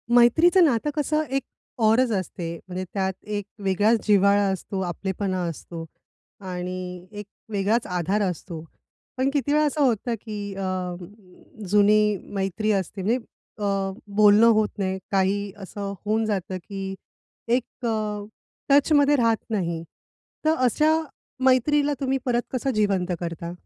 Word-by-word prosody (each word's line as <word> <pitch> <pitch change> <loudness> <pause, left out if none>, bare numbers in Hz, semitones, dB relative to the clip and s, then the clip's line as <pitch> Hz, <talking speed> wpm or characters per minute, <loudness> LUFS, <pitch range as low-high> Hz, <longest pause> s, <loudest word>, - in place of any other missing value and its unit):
मैत्रीचं 320 +10 +6
नातं 270 -1 +1
कसं 305 +1 +1
एक 275 - -2 0.4
औरच 235 +2 +4
असते 180 -3 -3
म्हणजे 185 0 -4
त्यात 190 -1 0
एक 205 -1 -4 0.2
वेगळाच 205 +4 +3
जिव्हाळा 200 0 +5
असतो, 190 +1 -4
आपलेपणा 190 +1 -2
असतो 165 +1 -7 0.5
आणि 180 -1 -5
एक 205 -1 -7 0.3
वेगळाच 210 +3 +1
आधार 180 +3 0
असतो. 170 -2 -7 0.5
पण 260 +1 +2
किती 285 0 +1
वेळा 305 0 +4
असं 295 +1 0
होतं 240 -2 +1
की 205 -3 -5
अ, 185 -2 -3 0.7
जुनी 210 +1 +4 0.2
मैत्री 195 +3 0
असते 195 0 -2
नई 220 +6 +2
अ, 200 -5 -4 0.2
बोलणं 210 +2 +7
होत 215 -1 +2
नाही, 190 -1 -1
काही 195 +1 +1
असं 200 0 -6
होऊन 220 +1 +1
जातं 190 -3 -2
की 195 +1 -6 0.5
एक 245 +1 -1
अ, 225 -1 +1 0.7
टचमध्ये 290 +1 +5
राहत 230 -4 +2
नाही. 170 -6 -2 0.6
तर 315 +1 +4
अशा 310 +6 +3 0.5
मैत्रीला 285 +3 +3
तुम्ही 270 -1 0
परत 240 -2 +2
कसं 265 +1 0
जिवंत 200 -4 +1
करता? 170 0 -5
205 Hz, 130 wpm, -24 LUFS, 190-240 Hz, 0.7 s, बोलणं